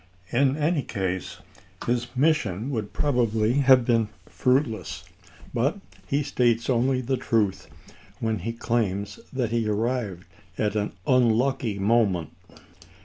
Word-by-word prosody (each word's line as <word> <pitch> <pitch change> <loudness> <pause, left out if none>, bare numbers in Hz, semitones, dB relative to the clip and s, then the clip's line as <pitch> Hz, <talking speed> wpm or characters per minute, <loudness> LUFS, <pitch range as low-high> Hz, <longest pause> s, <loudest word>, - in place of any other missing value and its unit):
In 135 +3 +2
any 155 0 +1
case 95 -6 -3 0.5
his 120 0 0
mission 130 - +1
would 110 -5 -3
probably 115 -5 +1
have 130 -3 +6
been 115 -3 +2 0.2
fruitless, 125 -6 0 0.5
but 140 - +1 0.3
he 145 +2 +1
states 120 -3 +1
only 130 +2 +2
the 130 +1 -1
truth 110 -5 0 0.5
when 110 -2 -1
he 110 +6 -3
claims 105 -4 -2
that 125 -4 -1
he 115 -2 0
arrived 105 -4 -1 0.3
at 105 0 0
an 105 -1 -1
unlucky 125 -2 +2
moment. 100 -5 +2
115 Hz, 120 wpm, -25 LUFS, 105-130 Hz, 0.5 s, have